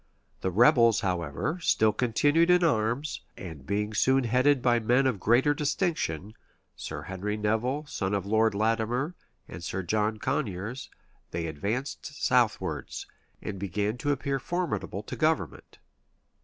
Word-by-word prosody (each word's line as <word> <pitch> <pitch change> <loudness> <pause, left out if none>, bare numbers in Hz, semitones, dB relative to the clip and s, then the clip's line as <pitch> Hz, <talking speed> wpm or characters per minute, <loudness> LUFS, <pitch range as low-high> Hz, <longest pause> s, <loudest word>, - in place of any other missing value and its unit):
The 95 - -1
rebels, 115 +3 +5
however, 90 - -2
still 110 -8 +3
continued 145 +9 +2
in 180 0 +5
arms; 125 0 0 0.2
and 80 -7 -9
being 105 +2 -1
soon 130 +5 +3
headed 130 +4 +3
by 120 -1 +3
men 125 +4 +2
of 125 -7 +1
greater 125 +9 +3
distinction: 145 - -1 0.4
Sir - - -6
Henry 100 +3 -3
Nevil, 115 +8 0
son 100 -8 -2
of 100 -2 -2
Lord 110 +1 +2
Latimer, 115 - 0 0.3
and 85 - -9
Sir 95 +2 -3
John 105 +4 0
Coniers, 105 +2 -3 0.4
they 85 0 -3
advanced 105 - -3
southwards, 125 -4 0 0.4
and 100 -3 -5
began 100 +3 -1
to 145 - 0
appear 140 0 -1
formidable 175 +4 -3
to - - -6
government. - - -1
115 Hz, 135 wpm, -28 LUFS, 100-135 Hz, 0.4 s, rebels